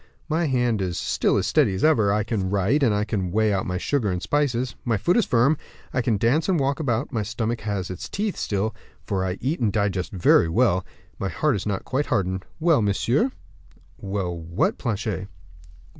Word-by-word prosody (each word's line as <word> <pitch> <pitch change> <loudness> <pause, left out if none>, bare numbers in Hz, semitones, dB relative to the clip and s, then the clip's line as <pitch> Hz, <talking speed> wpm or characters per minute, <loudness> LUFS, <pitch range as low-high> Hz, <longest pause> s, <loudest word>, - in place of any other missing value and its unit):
My 160 +2 +1
hand 120 -5 +1
is 90 -3 -2
still - - +1
as - - 0
steady 95 - +3
as 95 - -3
ever; 115 -11 +4
I 105 +1 +1
can 105 -4 -2
write, 100 +9 +2
and 105 -5 +2
can 95 -5 -1
weigh 110 +1 +2
out 95 - -1
my 90 0 -1
sugar 115 +2 0
and 90 - -1
spices; 130 -1 0
my 115 -3 +1
foot 170 - +2
is 235 - +3
firm; 125 +6 +3 0.4
I 125 - +1
can 115 -3 +1
dance 135 - +2
and 180 -4 +3
walk 140 +2 0
about; 130 -2 -1
my 115 -4 -1
stomach 110 +3 -2
has 100 -3 -3
its 90 - -7
teeth 205 -1 -2
still, 105 +2 -1 0.3
for 95 -3 -1
I 95 0 -2
eat 145 +7 -1
and 115 -4 +1
digest 100 -4 -1
very 85 -3 +4
well; 95 -1 +2 0.4
my 95 - -1
heart 150 +3 +1
is 100 - -4
not 100 -2 -2
quite 140 +3 -1
hardened. 95 0 -1
Well, 160 -5 +4
monsieur?" 115 - +1 0.7
"Well, 95 -3 -3
what, 85 +1 -1
Planchet?" 110 -5 -2
110 Hz, 200 wpm, -24 LUFS, 95-130 Hz, 0.7 s, ever